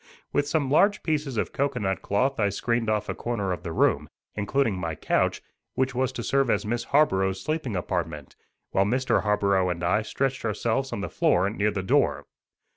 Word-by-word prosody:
With 145 - +1
some 145 -3 0
large 205 +7 +4
pieces 150 -6 -1
of - - -1
cocoanut 125 -9 -1
cloth 130 +6 0
I 100 -2 +3
screened 115 +3 -1
off 105 -1 0
a - - -2
corner 105 -6 -2
of 90 -2 -3
the 85 - -5
room, - - +1 0.2
including 110 +2 0
my 85 -3 -3
couch, - - 0 0.3
which 130 0 0
was 130 +1 0
to 120 - -5
serve 135 +2 +1
as - - +1
Miss 120 +2 -2
Harborough's 95 -10 +2
sleeping 150 -2 -2
apartment, 85 -5 -3 0.4
while 95 - +3
Mr. 130 +5 +1
Harborough 100 -3 +2
and 90 0 -3
I 90 +5 +2
stretched 130 +4 -2
ourselves 115 +4 -1
on 100 - -3
the - - -3
floor 95 +3 +2
near 105 -1 +1
the 100 -2 -3
door. 95 - +2
110 Hz, 190 wpm, -26 LUFS, 95-135 Hz, 0.4 s, large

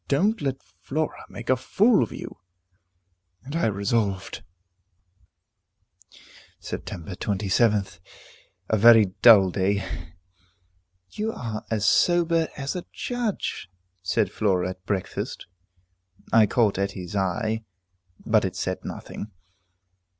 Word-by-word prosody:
Don't 205 +11 +1
let 135 -2 -1 0.2
Flora 155 +3 -3
make - - -9
a 130 - +4
fool 205 - +3
of 115 - -1
you." - - -8 1.0
And 140 +4 -7
I 170 - +2
resolved 100 -2 -1 2.2
Sept. - - -6 0.2
27th. 100 +1 0 0.7
A 110 - +2
very 110 -3 +7
dull 100 -6 +8
day. 100 +1 0 1.3
"You 220 +1 -2
are 110 -3 -5
as 110 -2 0
sober 170 0 +3
as 140 +2 -3
a 180 - -5
judge," 240 - -3 0.3
said - - 0
Flora 95 -3 0
at 95 0 -12
breakfast. 95 -3 -3 0.9
I 110 -2 +6
caught 105 -3 +2
Etty's 100 -1 -3
eye, 110 +4 -1 0.6
but - - +3
it - - -3
said - - -3
nothing. 105 - -7
110 Hz, 105 wpm, -25 LUFS, 100-140 Hz, 2.2 s, dull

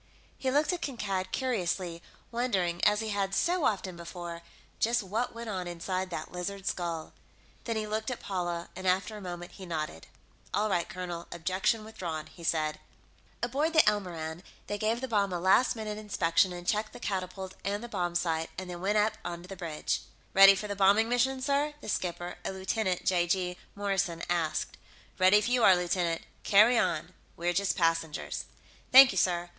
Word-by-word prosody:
He 265 - -2
looked 295 +6 +2
at 350 - -4
Kankad 195 -9 -2
curiously, 185 -8 -1 0.3
wondering, 190 -8 0
as 210 +1 +4
he 220 - -3
had 195 -1 -1
so 350 -3 +2
often 190 -3 0
before, 170 0 -7 0.4
just 235 0 +2
what 220 +6 -2
went 230 0 -6
on 185 -4 -3
inside 185 +2 -3
that 160 -3 -5
lizard 190 +2 -5
skull. 170 -3 -3 0.5
Then 230 - -1
he 215 -1 -1
looked 215 +2 -2
at 250 - -4
Paula, 175 -3 -3
and, 185 +1 -4
after 190 +4 +1
a 210 - -8
moment, 175 -1 -6
he 190 - -10
nodded. 155 - -4 0.5
"All 215 +1 +1
right, 175 -2 0
colonel, 175 -2 -5
objection 185 +6 0
withdrawn," 170 -8 -5
he 170 - -14
said. 155 -2 0 0.6
Aboard 285 +7 0
the 315 -7 +6
Elmoran, 175 -6 -1 0.2
they 205 - -4
gave 225 +3 0
the 260 - -2
bomb 205 -4 +1
a 175 - -2
last 190 +9 +4
minute 215 -1 -4
inspection 185 -3 +2
and 175 0 -7
checked 210 +3 0
the 245 - -9
catapult 190 -2 -4
and 205 +3 -2
the - - -5
bomb 175 -6 -2
sight, 165 -2 0
and 185 -1 -5
then 175 0 -7
went 205 +3 +1
up 215 +1 +2
on 170 0 -5
the 190 +2 -8
bridge. 165 -4 -2 0.3
"Ready 195 0 +9
for 210 +2 -4
the 205 - -3
bombing 200 +3 +4
mission, 260 +2 +1
sir?" 285 +2 +1
the - - -10
skipper, 175 -2 -3
a - - -2
Lieutenant 190 0 -1
(j.g.) 180 0 +1 0.2
Morrison, 195 -4 -1
asked. 160 -3 -1 0.4
"Ready 185 +2 +7
if 210 - +1
you 245 -1 +2
are, 190 - +8
lieutenant. 175 -1 0 0.2
Carry 215 +5 +6
on; 170 -4 -1 0.2
we're 175 +1 0
just 195 +2 +1
passengers." 165 -3 0 0.5
"Thank 265 0 +10
you, 190 - 0
sir. 175 -1 +1
190 Hz, 185 wpm, -30 LUFS, 175-215 Hz, 0.6 s, Thank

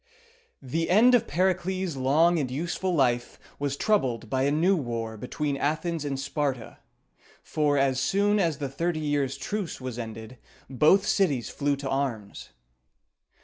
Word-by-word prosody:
The 160 +6 -2
end 225 +7 +6
of 245 - +3
Pericles' 185 0 0
long 155 +6 +3
and 135 -4 -2
useful 175 +6 -2
life 120 -4 +1 0.2
was 140 -1 -2
troubled 125 - 0
by 130 0 +1
a 140 - +2
new 170 +6 +3
war 115 -7 -3
between 140 +6 -3
Athens 155 +3 -1
and 140 -2 -3
Sparta; 140 -3 -3 0.6
for, 150 -2 +1
as 135 -1 +2
soon 200 +10 +2
as 165 -6 +1
the 145 -2 -3
thirty 165 +4 -2
years' 145 -3 -1
truce 195 +6 -4
was 130 -2 -6
ended, 115 +1 -8 0.3
both 155 +9 +4
cities 145 - +1
flew 145 -1 0
to 140 -1 -5
arms. 120 -7 -3
145 Hz, 145 wpm, -26 LUFS, 130-170 Hz, 0.6 s, end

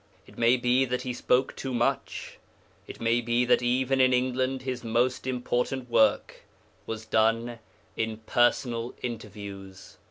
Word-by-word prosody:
It - - -17
may 120 +2 +4
be 125 +1 +2
that 125 0 -2
he 125 - -3
spoke 125 +1 +1
too 130 -2 -4
much; 120 0 -2 0.5
it - - -9
may 115 +1 +2
be 120 +1 +1
that 125 - +3
even 130 +2 +1
in 130 0 +4
England 130 +1 0
his 130 -2 -4
most 120 +3 0
important 125 0 -2
work 110 - +3 0.5
was 110 0 -5
done 115 +2 +1 0.4
in 110 -1 -2
personal 120 +1 0
interviews. 100 -4 -8
120 Hz, 145 wpm, -27 LUFS, 115-125 Hz, 0.5 s, may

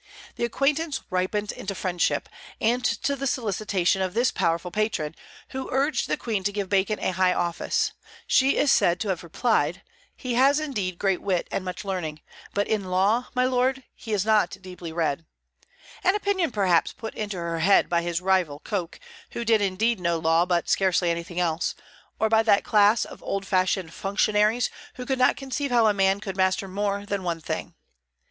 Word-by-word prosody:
The - - -1
acquaintance 280 +4 0
ripened 195 +3 -1
into 195 0 -6
friendship; 175 -1 0 0.3
and 240 +3 +1
to 280 +3 0
the 275 0 -3
solicitation 200 -6 0
of 185 0 -2
this 240 +2 +3
powerful 170 +2 -1
patron, 210 -8 -1 0.4
who 265 0 -5
urged 275 +1 +1
the - - 0
Queen 215 -5 -2
to 205 - 0
give 200 -2 -3
Bacon 200 +2 +1
a - - -1
high 185 0 +2
office, 170 -1 0 0.3
she 270 +1 +3
is 290 - +3
said 175 +1 +3
to 210 - -2
have 180 -3 -1
replied: 220 +8 0 0.3
"He 255 -3 -3
has 275 +4 +4
indeed 205 - -3
great 195 -1 0
wit 185 -3 -1
and 195 - -2
much 185 +2 -6
learning, 160 -6 -4 0.3
but 205 0 0
in 215 -3 -1
law, 195 +7 +1
my 250 0 +3
lord, 255 +1 +1
he 220 - -9
is 205 -2 +1
not 210 -3 +2
deeply 180 -3 -8
read," 160 -2 -1 0.8
an 375 +2 +3
opinion 400 -6 0
perhaps 190 -6 +2
put 225 - -7
into 205 -3 -4
her 170 -1 -3
head 195 +5 +4
by 170 -1 +1
his 170 0 -2
rival 180 -6 +1
Coke, 185 -6 -4 0.3
who 235 - -4
did 225 -2 +4
indeed 205 +3 +1
know 170 -1 0
law 165 +2 +2
but 175 -2 +1
scarcely 185 -2 +2
anything 170 +1 -4
else, 170 -1 0 0.4
or 220 - +3
by 220 0 +4
that 210 -3 +3
class 210 +1 +4
of - - -12
old 195 0 -3
fashioned 185 -3 0
functionaries 210 +4 +1 0.2
who 250 - -6
could 265 0 -1
not 255 - +4
conceive 280 +1 -3
how 240 -2 +4
a 215 - +4
man 195 0 +2
could 195 -2 -6
master 190 +1 +1
more 200 +1 -2
than 200 -1 -2
one 170 -2 -2
thing. 160 - -5
200 Hz, 185 wpm, -25 LUFS, 180-230 Hz, 0.8 s, has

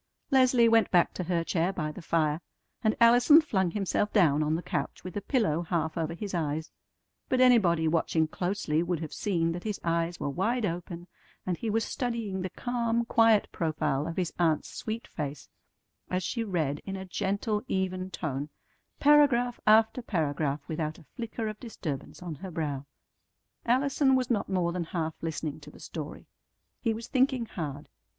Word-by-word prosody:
Leslie 255 -3 +5
went 225 -1 +4
back 175 -2 +3
to 180 - -4
her 170 -1 0
chair 170 +1 0
by 155 -5 -3
the 180 - -9
fire, 160 -1 +1 0.4
and 220 -1 +2
Allison 245 +6 +7
flung 190 - +1
himself 205 +2 -1
down 155 -8 +4
on 155 +1 +1
the 170 - -3
couch 140 -2 -3
with 185 - -7
a 205 - -2
pillow 200 - +1
half 160 -2 -1
over 165 -1 -2
his 200 +2 -6
eyes; 160 -1 -2 0.6
but 255 - +2
anybody 195 -11 +5
watching 160 0 +2
closely 175 -2 -1
would 175 -1 -1
have 155 -2 -6
seen 170 -5 0
that 175 +1 -5
his 210 -2 -3
eyes 170 0 0
were - - -2
wide 220 - 0
open 175 -1 -4 0.4
and 180 - 0
he 230 - -3
was 225 +1 +1
studying 230 -6 -3
the 185 - -3
calm, 235 +1 -1
quiet 225 -2 +4
profile 155 -4 -1
of 165 - -5
his 180 -3 -1
aunt's 160 -3 +2
sweet 225 +1 -5
face 145 -2 -6 0.6
as 185 0 -1
she 230 +6 -2
read 160 -9 -1
in 195 - -5
a 190 0 -6
gentle, 200 +3 -1
even 185 -3 -1
tone, 145 -5 -4 0.5
paragraph 275 -5 +4
after 220 +3 +5
paragraph 150 - -1
without 155 -1 -3
a 165 - -17
flicker 230 -1 -4
of 215 0 -5
disturbance 180 - -6
on 175 -3 -4
her 185 +6 -8
brow. 145 -5 -3 0.8
Allison 265 +2 +3
was 255 -1 0
not 210 -4 0
more 180 -3 +1
than 175 -1 -2
half 160 -1 -2
listening 160 -2 -3
to 150 0 -12
the - - -15
story. 155 -2 -7 0.6
He 230 - +1
was 225 +2 -5
thinking 260 -2 +2
hard. 150 -8 -6
180 Hz, 175 wpm, -29 LUFS, 160-225 Hz, 0.8 s, Allison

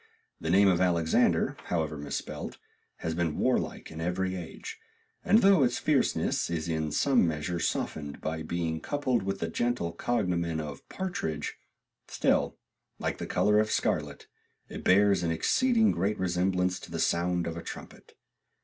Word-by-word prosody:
The 80 - -3
name 100 +3 +5
of 90 -2 +3
Alexander, 85 -3 +2
however 80 -3 -1
mis 75 -1 -5
spelt, - - -5 0.4
has 80 - -2
been 80 -2 -1
warlike - - 0
in 80 +1 -7
every 95 +2 -1
age, 85 -3 -8 0.4
and 220 +1 +4
though 195 -4 +6
its 125 -2 +2
fierceness 145 - +1
is 85 -2 -2
in 80 -2 -1
some 130 - +3
measure 80 +2 -2
softened 75 -3 -2
by 80 0 -3
being 80 0 -2
coupled 130 - 0
with 95 0 -2
the - - 0
gentle 120 -8 -1
cognomen 85 -5 -1
of 75 -2 -7
Partridge, 80 - -3 0.5
still, - - +1 0.4
like - - -3
the - - -4
color 105 0 +3
of 110 0 +1
scarlet, - - -1 0.4
it - - -7
bears 100 0 +4
an 85 - 0
exceeding 225 - +3
great 100 +4 0
resemblance 90 0 0
to - - -11
the - - -4
sound 90 0 +1
of 85 - -3
a 85 - -5
trumpet. - - -10
90 Hz, 160 wpm, -29 LUFS, 80-105 Hz, 0.5 s, though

